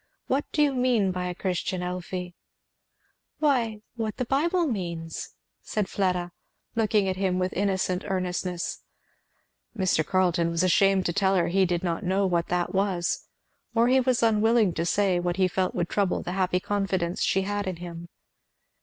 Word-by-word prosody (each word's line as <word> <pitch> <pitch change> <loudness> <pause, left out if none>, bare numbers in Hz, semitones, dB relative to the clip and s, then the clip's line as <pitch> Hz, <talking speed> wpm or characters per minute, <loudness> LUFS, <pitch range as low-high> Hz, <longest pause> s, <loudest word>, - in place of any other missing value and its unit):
"What 275 +3 0
do 300 - +3
you 285 -2 +2
mean 245 -6 +2
by 180 0 -3
a 180 - -4
Christian, 180 0 -2
Elfie?" 180 0 -4 1.0
"Why, 240 -8 +1
what 220 -3 -3
the 255 - -1
Bible 335 +8 +1
means," 170 - -4 0.3
said 210 -3 -2
Fleda, 180 -3 -1 0.4
looking 215 -3 +2
at 185 0 -1
him 185 -1 0
with 185 0 -1
innocent 190 -1 0
earnestness. 180 -2 -2 1.0
Mr. 185 -5 +2
Carleton 175 -1 +1
was 170 +1 0
ashamed 195 +1 +3
to 170 - 0
tell 195 +1 +2
her 170 -2 +2
he 190 +1 +3
did 175 0 -1
not 170 +2 -1
know 190 +2 +1
what 170 -2 +1
that 180 -1 -1
was, 190 -3 0 0.5
or 230 +2 +4
he 260 +1 +5
was 255 -2 +1
unwilling 220 -2 +3
to 165 +1 -1
say 190 -2 +2
what 175 0 -1
he 190 -1 +4
felt 185 0 -1
would 175 - 0
trouble 200 -1 0
the - - -4
happy 185 -1 +1
confidence 190 -3 -1
she 190 - +2
had 205 0 -2
in 185 - -2
him. 170 0 -8
190 Hz, 170 wpm, -26 LUFS, 180-210 Hz, 1.0 s, he